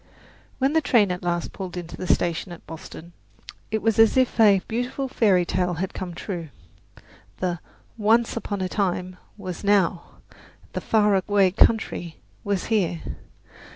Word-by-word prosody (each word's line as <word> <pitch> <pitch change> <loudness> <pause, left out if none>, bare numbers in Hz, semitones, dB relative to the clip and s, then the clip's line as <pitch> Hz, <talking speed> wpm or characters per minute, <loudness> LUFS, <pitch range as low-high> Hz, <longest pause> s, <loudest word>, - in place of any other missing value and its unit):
When 270 +2 +1
the 320 - +3
train 215 -10 +3
at 180 - -4
last 175 -1 -2
pulled 185 -2 -6
into 175 -1 -6
the 185 - -6
station 175 +2 0
at 175 - -11
Boston 165 +1 -10 0.6
it 220 0 -2
was 225 -1 +2
as 225 +3 +6
if 255 -2 +2
a 205 -3 +6
beautiful 250 +4 -2
fairy 195 -8 +3
tale 180 0 0
had 190 +3 -3
come 180 -2 -6
true. 170 -4 -5 0.9
The 175 -2 -2 0.4
"once 225 +2 +3
upon 205 -4 -3
a 185 - 0
time" 185 -2 -2 0.2
was 185 -3 -6
now; 195 -4 +1 0.6
the - - -3
"far 210 -2 +3
away 195 0 +3
country" 195 -5 +1 0.3
was 200 -3 -1
here. 175 -6 +1
195 Hz, 155 wpm, -24 LUFS, 175-220 Hz, 0.9 s, as